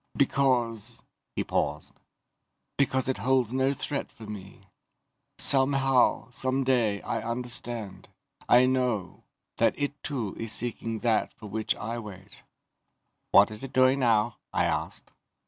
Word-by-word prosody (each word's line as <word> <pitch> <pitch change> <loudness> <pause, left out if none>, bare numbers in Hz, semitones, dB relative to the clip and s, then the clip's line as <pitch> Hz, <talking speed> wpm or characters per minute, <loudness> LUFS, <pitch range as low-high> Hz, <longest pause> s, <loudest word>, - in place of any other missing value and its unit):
"Because 120 -5 +1
..." - - -56
He - - 0
paused. - - -2 0.8
"Because 130 -2 +1
it 130 -5 -1
holds 125 +1 +1
no 130 +1 +2
threat 140 +1 -4
for 110 - -12
me. 100 -2 -9 0.7
Somehow, 135 -2 +3
someday, 130 -5 +1
I - - -2
understand 120 -3 -5 0.4
I 125 +1 +7
know 125 -6 -1 0.3
that - - +2
it 145 0 -3
too 120 -10 -3
is 115 -1 -4
seeking 115 -1 -3
that 115 -3 +1
for 110 - -12
which 110 +1 -1
I 115 +3 -4
wait." 100 -3 -11 0.9
"What 100 +2 +7
is 110 +4 -8
it 135 - -7
doing 130 +1 +4
now?" 115 -2 +2
I - - +1
asked. - - -3
120 Hz, 130 wpm, -28 LUFS, 110-130 Hz, 0.9 s, I